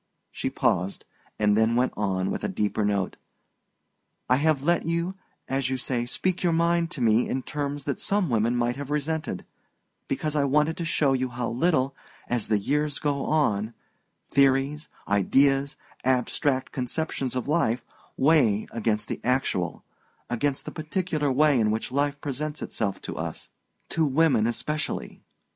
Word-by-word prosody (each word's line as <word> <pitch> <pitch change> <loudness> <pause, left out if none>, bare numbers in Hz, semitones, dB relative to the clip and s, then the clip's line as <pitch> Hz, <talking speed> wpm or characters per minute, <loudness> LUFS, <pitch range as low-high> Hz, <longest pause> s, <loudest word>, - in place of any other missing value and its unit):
She - - -2
paused, 90 +3 0 0.3
and 105 -1 +3
then 110 +2 +3
went 125 +1 +2
on 95 -2 0
with - - -3
a - - +1
deeper 105 0 -1
note: 100 -2 0 1.1
"I 125 - +4
have 150 -1 +2
let 170 +2 +2
you, 170 +2 0 0.3
as 135 -1 0
you 130 - -1
say, 120 -1 -1
speak 185 +8 -1
your 175 -2 +2
mind 170 0 +2
to 160 -7 -5
me 115 +1 +3
in 130 0 -1
terms 145 0 -3
that 140 -2 -2
some 200 -2 +1
women 115 -1 +1
might 120 +1 0
have 145 -1 -6
resented, 150 - -2 0.6
because 155 -1 -1
I 145 - +3
wanted 150 +3 +2
to 170 - -3
show 145 -4 +2
you 130 -1 0
how 120 -1 -3
little, 135 +1 +1 0.3
as 120 -2 -1
the 105 - +3
years 145 +7 0
go 145 -2 -1
on, 110 -8 +1 0.6
theories, 140 +2 +2 0.2
ideas, 135 +8 +3 0.3
abstract 130 +1 +1
conceptions 130 0 -2
of 125 - -2
life, 130 -7 +1 0.3
weigh 130 -8 +4
against 110 -2 -1
the - - -4
actual, 125 -9 0 0.5
against 135 +3 0
the - - -5
particular 155 -2 -1
way 145 0 +4
in 110 -1 +3
which 110 +3 -2
life 145 +1 0
presents 150 +2 -3
itself 100 -3 -3
to - - -6
us - - -5 0.4
to 160 -2 +1
women 140 -6 +3
especially. 150 +6 -3
135 Hz, 155 wpm, -26 LUFS, 120-150 Hz, 1.1 s, I